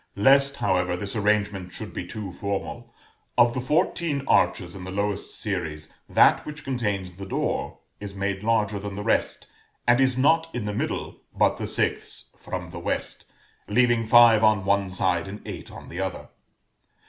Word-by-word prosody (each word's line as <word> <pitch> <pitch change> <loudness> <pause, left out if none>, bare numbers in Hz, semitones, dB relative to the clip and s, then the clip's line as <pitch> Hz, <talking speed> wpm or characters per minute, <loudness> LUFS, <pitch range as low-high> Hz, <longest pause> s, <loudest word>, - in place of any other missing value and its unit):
Lest, 140 +6 +4
however, 90 -7 0
this 100 +3 -2
arrangement 100 -3 0
should 110 +3 -8
be 90 - -5
too 105 -1 -6
formal, 100 0 -4 0.5
of 120 -1 +5
the 130 - -2
fourteen 150 +1 0
arches 90 -4 +2
in 95 - -9
the 95 - -7
lowest 100 +1 -2
series, 80 -7 -4 0.2
that - - +5
which 150 0 -8
contains 100 -8 -2
the 100 - -7
door - - -2 0.2
is 100 -1 -7
made 100 0 -2
larger 105 -2 +1
than 100 0 -6
the 105 - -5
rest, - - 0 0.4
and 120 +2 +4
is 130 -1 +3
not 160 +5 +3
in 120 -4 -3
the 105 - -2
middle, - - -3 0.2
but - - +3
the - - -4
sixth - - -2
from - - -6
the - - -7
West, - - -3 0.4
leaving 120 +1 +3
five 115 -1 +6
on 105 -3 +3
one 100 -1 +2
side 90 -2 0
and 100 +2 -7
eight - - -7
on - - -11
the 85 - -7
other. 95 -1 -4
105 Hz, 170 wpm, -25 LUFS, 95-120 Hz, 0.5 s, five